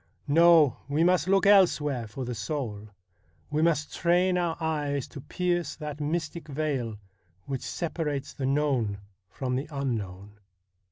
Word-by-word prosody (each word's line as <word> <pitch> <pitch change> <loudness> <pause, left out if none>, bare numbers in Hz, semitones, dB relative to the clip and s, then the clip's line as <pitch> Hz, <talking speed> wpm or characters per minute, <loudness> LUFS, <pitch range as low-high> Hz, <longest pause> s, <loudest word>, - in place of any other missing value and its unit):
No, 160 -3 +6
we 150 +3 +2
must 180 -2 +3
look 195 +1 +3
elsewhere 150 - +4
for 125 +4 -6
the 125 - -3
soul; 110 -2 -4 0.6
we 150 +1 +1
must 160 -2 +1
train 180 +1 +2
our 175 -2 0
eyes 150 -4 -1
to 140 - -9
pierce 175 +3 -1
that 150 -1 -6
mystic 160 +2 -3
veil 135 -7 -2 0.5
which 135 -2 -4
separates 155 -5 -3
the 130 - -3
known 135 -8 +1 0.3
from 125 +5 -3
the 135 +3 -3
un 140 -4 -2
known.' 100 0 -8
150 Hz, 145 wpm, -27 LUFS, 130-165 Hz, 0.6 s, No